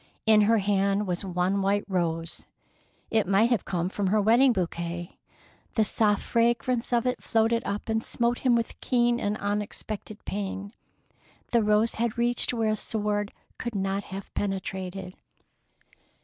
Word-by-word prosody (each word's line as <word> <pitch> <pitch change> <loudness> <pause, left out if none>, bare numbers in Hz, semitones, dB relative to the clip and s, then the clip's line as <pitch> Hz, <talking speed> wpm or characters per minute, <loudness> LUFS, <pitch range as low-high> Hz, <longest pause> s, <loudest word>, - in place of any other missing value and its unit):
In 215 -1 +6
her 225 +2 +4
hand 200 0 +1
was 180 0 -2
one 185 +1 0
white 200 +1 +1
rose. 165 -3 -2 0.6
It 220 -4 +2
might 205 +5 +3
have 240 - +1
come 175 -1 -1
from 195 +1 -2
her 210 +3 +3
wedding 235 +6 +5
bouquet. 175 -3 -3 0.6
The 220 - +4
soft 210 0 +2
fragrance 235 +1 +1
of 240 -1 +2
it 250 - -1
floated 230 0 +1
up 200 +1 -3
and 225 0 0
smote 235 0 0
him 250 -2 +3
with 230 -1 -2
keen 240 -1 +2
and 205 -1 -1
unexpected 210 +1 -4
pain. 200 +1 -4 0.8
The 235 - +4
rose 210 +2 +3
had 235 -1 0
reached 240 0 +1
where 225 -3 0
a - - +1
sword 210 -1 -2 0.3
could 240 -3 -4
not 195 +1 -1
have 195 0 -8
penetrated. 190 -1 -4
210 Hz, 150 wpm, -27 LUFS, 195-230 Hz, 0.8 s, In